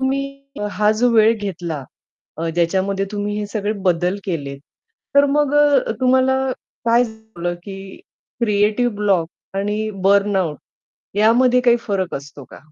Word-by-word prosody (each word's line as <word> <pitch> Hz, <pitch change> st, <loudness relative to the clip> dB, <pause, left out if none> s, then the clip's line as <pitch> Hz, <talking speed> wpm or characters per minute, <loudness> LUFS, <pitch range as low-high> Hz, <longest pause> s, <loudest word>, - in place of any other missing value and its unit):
तुम्ही. 275 Hz, +1 st, -2 dB, 0.3 s
हा 210 Hz, 0 st, +2 dB
जो 245 Hz, +2 st, +4 dB
वेळ 220 Hz, 0 st, +6 dB
घेतला 175 Hz, -8 st, -4 dB, 0.5 s
अ, 165 Hz, +1 st, -2 dB
ज्याच्यामध्ये 190 Hz, +3 st, 0 dB
तुम्ही 205 Hz, 0 st, -2 dB
हे 210 Hz, -, -3 dB
सगळे 205 Hz, 0 st, -2 dB
बदल 180 Hz, 0 st, +1 dB
केलेत, 145 Hz, -7 st, -4 dB, 0.6 s
तर 280 Hz, 0 st, +7 dB
मग 295 Hz, -1 st, +2 dB
अ, 290 Hz, -2 st, +4 dB
तुम्हाला 260 Hz, +1 st, +3 dB, 0.5 s
काय 235 Hz, +1 st, +4 dB
झालं. 220 Hz, -6 st, -6 dB
की 195 Hz, 0 st, -9 dB, 0.4 s
क्रिएटिव्ह 215 Hz, +2 st, +1 dB
ब्लॉक 195 Hz, -5 st, +1 dB, 0.3 s
आणि 210 Hz, +2 st, -1 dB
बर्नआउट 195 Hz, -5 st, +2 dB, 0.6 s
यामध्ये 240 Hz, +4 st, +4 dB
काही 240 Hz, -1 st, +4 dB
फरक 190 Hz, -4 st, -1 dB
असतो 140 Hz, 0 st, -8 dB
का? -, -, -11 dB
205 Hz, 130 wpm, -20 LUFS, 185-240 Hz, 0.6 s, तर